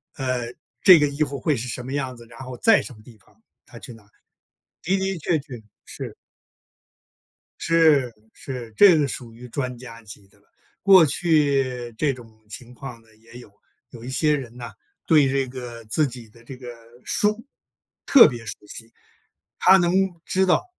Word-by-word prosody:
呃， 125 -3 -3 0.3
这 185 -4 +8
个 150 - +2
衣 140 +2 -1
服 140 -2 -5
会 150 +2 0
是 125 0 -5
什 125 0 -6
么 130 +2 -7
样 135 -3 -3
子， 120 - -14
然 115 +1 -15
后 130 -2 -8
在 225 -2 +4
什 130 - -9
么 110 - -17
地 115 -2 -16
方， 105 +2 -29 0.2
他 120 - -14
去 120 +1 -10
拿， 115 -2 -17
的 100 - -29 0.9
的 190 -1 -2
确 160 +1 0
确， 135 -5 -10 0.2
是。 - - -8 1.5
是 155 -7 +3 0.2
是， 125 -4 -8
这 190 - +7
个 145 - +1
属 120 -3 -7
于 125 +2 -12
专 125 0 -4
家 115 -2 -11
级 100 -1 -12
的 100 - -27
了， 100 - -33 0.4
过 190 -3 +7
去 135 -7 0
这 145 +3 0
种 115 -4 -14
情 125 +3 -11
况 125 -2 -10
呢， 115 - -26
也 115 +2 -15
有。 120 - -14 0.4
有 115 -2 -12
一 125 - -8
些 150 +3 +1
人 125 -5 -6
呢， 120 -2 -8 0.3
对 150 -4 +4
这 135 0 0
个 125 -2 -9
自 145 +8 0
己 120 -3 -10
的 115 +2 -20
这 130 +3 -11
个 125 -1 -10 0.3
书 210 +3 0 0.6
特 275 - +8
别 120 -5 -6
熟 105 - -4
悉， 115 +2 -12 0.7
他 190 +1 +6
能 175 -2 +1 0.3
知 190 0 +1
道 180 - +2
125 Hz, 195 characters per minute, -23 LUFS, 115-150 Hz, 1.5 s, 这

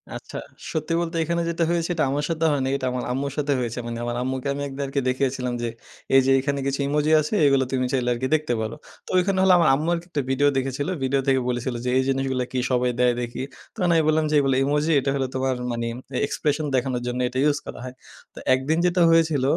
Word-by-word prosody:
আচ্ছা - - -8 0.4
সত্যি 160 +1 -2
বলতে 170 0 -4
এখানে 170 +2 -1
যেটা 170 0 0
হয়েছে 170 -1 +1
সেটা 165 -3 +1
আমার 145 +2 -1
সাথে 165 -1 0
হয় 145 -2 0
নাই। 135 - 0
এটা 135 - -4
আমার 125 0 -3
আম্মুর 140 +2 -2
সাথে 145 -1 +1
হয়েছে 120 -1 -3
মানে 115 0 -4
আমার 120 0 -2
আম্মুকে 130 +1 -3
আমি 140 - -5
এক 135 - -8
দের 140 - -1
কে - - -4
আরকি - - +3
দেখিয়েছিলাম 130 -1 -1
যে, 120 - -1 0.5
এই 135 - +8
যে, 135 - +3
এখানে 140 +1 -1
কিছু 140 +1 -1
ইমোজি 150 +2 +1
আছে 155 +4 -2
এইগুলো 135 -1 +4
তুমি 130 -1 0
চাইলে 125 -2 +1
আরকি 125 +2 -2
দেখতে 155 -5 -1
পারো। 110 +1 -4 0.3
তো - - -14
ওইখানে 185 +1 +2
হলো 190 -1 +6
আমার 170 -4 +4
আম্মু 155 +4 -1
আরকি 170 0 -3
একটা 145 - 0
ভিডিও 135 +2 +3
দেখেছিলো। 135 +5 -2
ভিডিও 135 +1 +1
থেকে 135 -1 +4
বলেছিলো 120 0 -2
যে, - - 0
এই 130 - +3
জিনিসগুলো 135 -1 0
কি 130 - -1
সবাই 125 0 +2
দেয় 125 -1 +4
দেখি। 120 +1 -5 0.3
তখন 180 -5 0
আমি 160 - +4
বললাম 155 0 +3
যে, - - -2
এইগুলো 135 -2 +2
ইমোজি 150 +2 +1
এইটা 135 +1 -2
হইলো 135 -1 -1
তোমার 130 0 0 0.2
মানে 115 0 -2
ম - - -8
অ্যা 125 - -1
expression 150 +1 -1
দেখানোর 125 -1 0
জন্য 125 0 -2
এটা 125 - -5
ইউজ 150 0 +3
করা - - -8
হয়। 130 0 -8 0.4
তো - - -10
একদিন 135 +5 +1
যেটা 180 0 +2
হয়েছিল 160 -4 +3
135 Hz, 245 wpm, -24 LUFS, 130-155 Hz, 0.5 s, এই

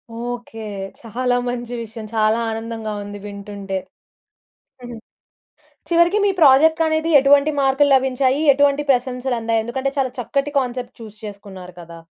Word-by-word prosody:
Okay. 240 -1 -6 0.4
చాలా 245 +2 -1
మంచి 245 0 -4
విషయం 225 0 -9
చాలా 220 0 +2
ఆనందంగా 225 -1 -5
ఉంది 205 0 -8
వింటుంటే. 200 -1 -6 1.1
హ్మ్. 240 -1 -8 0.9
చివరికి 340 +3 +3
మీ 400 - +3
ప్రాజెక్టనేది 315 +2 +4
ఎటువంటి 280 +2 +4
మార్కులు 270 +2 +3
లభించాయి? 265 +1 +1
ఎటువంటి 285 +1 +2
ప్రశంసలందాయి? 245 -3 -1
ఎందుకంటే 265 +3 -2
చాలా 260 -2 0
చక్కటి 275 +4 -2
కాన్సెప్ట్ 250 -1 -5
చూ‌స్ 215 -1 -11
చేసుకున్నారు 195 -3 -10
కదా! 170 0 -12
245 Hz, 120 wpm, -20 LUFS, 220-275 Hz, 1.1 s, ప్రాజెక్టనేది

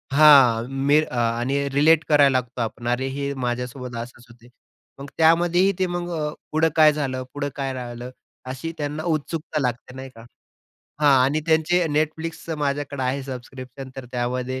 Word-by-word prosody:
हां. 135 -6 +6 0.2
मी 150 +2 +5
आणि 120 +4 0
रिलेट 155 +3 +4
करायला 140 -3 +5
लागतो 125 0 -7
आपण. 115 +1 -4
अरे, 125 +2 0
हे 140 +1 -3
माझ्यासोबत 125 0 -5
असंच 120 0 -15
होतंय. 120 0 -18 0.5
मग 140 - -8
त्यामध्येही 175 +4 +4
ते 185 - +1
मग 175 0 -5
अ, 150 0 -2 0.2
पुढं 160 +1 +3
काय 155 -2 +6
झालं, 130 -3 -3
पुढं 145 0 -3
काय 135 -1 -3
राहिलं? 120 -1 -7 0.3
अशी 130 +5 -5
त्यांना 150 +1 -3
उत्सुकता 155 -1 -2
लागते, 125 0 -3
नाही 130 0 -8
का. 115 - -13 0.8
हां, 145 -2 +5
आणि 145 +4 +1
त्यांचं 160 +1 +2
Netflixचं 160 +1 -2
माझ्याकडं 140 -1 -2
आहे 130 +2 -1
सबस्क्रिप्शन. 130 0 -9
तर 135 - -7
त्यामध्ये 125 +1 -2
140 Hz, 155 wpm, -23 LUFS, 125-155 Hz, 0.8 s, हां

